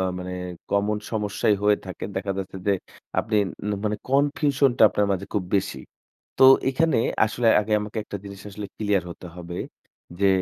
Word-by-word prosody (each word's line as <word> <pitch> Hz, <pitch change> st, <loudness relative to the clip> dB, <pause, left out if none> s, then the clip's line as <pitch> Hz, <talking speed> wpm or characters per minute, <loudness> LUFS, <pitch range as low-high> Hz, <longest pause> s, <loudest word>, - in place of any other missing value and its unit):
আ -, -, +1 dB, 0.2 s
মানে 90 Hz, 0 st, -5 dB, 0.4 s
কমন 105 Hz, +1 st, +1 dB
সমস্যাই 105 Hz, -1 st, +1 dB
হয়ে 105 Hz, 0 st, +4 dB
থাকে। 95 Hz, -, -6 dB
দেখা 100 Hz, +1 st, -1 dB
যাচ্ছে 95 Hz, 0 st, -5 dB
যে, 100 Hz, -, +4 dB, 0.5 s
আপনি 110 Hz, -1 st, 0 dB, 0.3 s
উন 105 Hz, -, -1 dB
মানে 105 Hz, 0 st, 0 dB
কনফিউশন 140 Hz, 0 st, +3 dB
টা -, -, +5 dB
আপনার 105 Hz, 0 st, +1 dB
মাঝে 95 Hz, +1 st, -3 dB
খুব 100 Hz, -, 0 dB
বেশি। 95 Hz, -, -2 dB, 0.6 s
তো -, -, +7 dB, 0.2 s
এইখানে 160 Hz, +1 st, +2 dB, 0.3 s
আসলে 115 Hz, +2 st, -1 dB
আগে 105 Hz, +1 st, -3 dB
আমাকে 105 Hz, +2 st, -7 dB
একটা 100 Hz, -, -5 dB
জিনিস 100 Hz, -1 st, -9 dB
আসলে 100 Hz, 0 st, -6 dB
ক্লিয়ার 105 Hz, -3 st, +1 dB
হতে 90 Hz, -, -9 dB
হবে। 90 Hz, 0 st, -6 dB, 0.6 s
যে 100 Hz, -, +5 dB
105 Hz, 175 wpm, -24 LUFS, 100-110 Hz, 0.6 s, তো